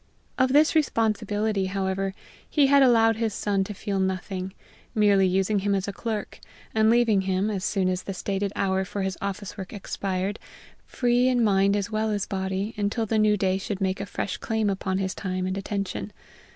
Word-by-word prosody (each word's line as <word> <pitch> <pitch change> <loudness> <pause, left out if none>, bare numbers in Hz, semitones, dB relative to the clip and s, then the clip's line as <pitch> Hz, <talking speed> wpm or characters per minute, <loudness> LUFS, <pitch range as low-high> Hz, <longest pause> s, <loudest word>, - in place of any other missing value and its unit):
Of 260 0 +3
this 300 +3 +5
responsibility, 215 -7 +1
however, 190 0 -2 0.3
he 295 -3 +4
had 280 +1 +5
allowed 225 -4 +5
his 225 -3 -1
son 200 -2 0
to 210 - -6
feel 200 0 -2
nothing, 190 0 -2 0.4
merely 200 -3 +4
using 195 +3 +1
him 200 +1 +1
as 190 -1 -2
a 200 - -3
clerk, 220 -2 -4 0.3
and 220 0 +4
leaving 230 -4 +4
him, 190 +2 0
as 195 -3 -3
soon 190 -2 +1
as 185 0 0
the 195 - -5
stated 195 +1 -2
hour 190 -1 +1
for 195 +1 -4
his 190 -1 -2
office 200 +1 -5
work 190 - -6
expired, 195 0 -3 0.5
free 245 0 +2
in 250 -2 +3
mind 200 -1 +3
as 205 +2 -2
well 215 0 0
as 205 -1 -1
body, 190 +2 -3
until 210 +2 0
the 220 +1 +1
new 210 -1 +4
day 190 -1 +1
should 195 0 -4
make 190 0 -1
a 200 - -5
fresh 200 - -3
claim 220 -2 0
upon 190 -1 -2
his 190 -1 -1
time 185 -1 -3
and 185 0 -2
attention. 195 0 -3
200 Hz, 190 wpm, -25 LUFS, 190-220 Hz, 0.5 s, this